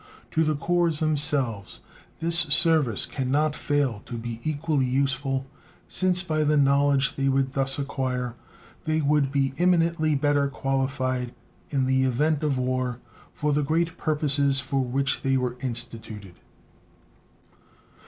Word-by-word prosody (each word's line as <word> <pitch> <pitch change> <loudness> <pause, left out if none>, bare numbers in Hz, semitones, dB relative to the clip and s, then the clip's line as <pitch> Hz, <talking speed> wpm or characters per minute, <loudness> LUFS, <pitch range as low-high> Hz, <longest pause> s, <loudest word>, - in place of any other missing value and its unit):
To 160 - +2
the 155 -1 +1
corps 170 +1 +1
themselves 145 -9 -1 0.4
this 165 +1 +1
service 155 - +4
can 130 -2 -4
not 150 +2 +1
fail 140 -7 -1
to 120 - -5
be 115 0 -6
equally 150 -3 0
useful, 135 0 0 0.4
since 185 -1 +1
by 155 -3 0
the 150 0 +2
knowledge 140 -1 +3
they 135 0 0
would 135 -1 0
thus 135 -1 +2
acquire 130 -3 -3 0.5
they 155 0 +1
would 145 -2 +1
be 135 -2 0
eminently 170 -3 +2
better 145 0 +2
qualified 130 -2 -2 0.3
in 135 -3 0
the 130 0 +2
event 145 +4 +1
of 145 -4 0
war 130 -1 -2 0.3
for 150 0 -1
the 150 - +2
great 165 +3 0
purposes 145 -3 +1
for 135 0 -1
which 135 +2 -1
they 135 -1 +1
were 125 -1 -2
instituted. 115 -6 -6
140 Hz, 135 wpm, -25 LUFS, 130-150 Hz, 0.5 s, service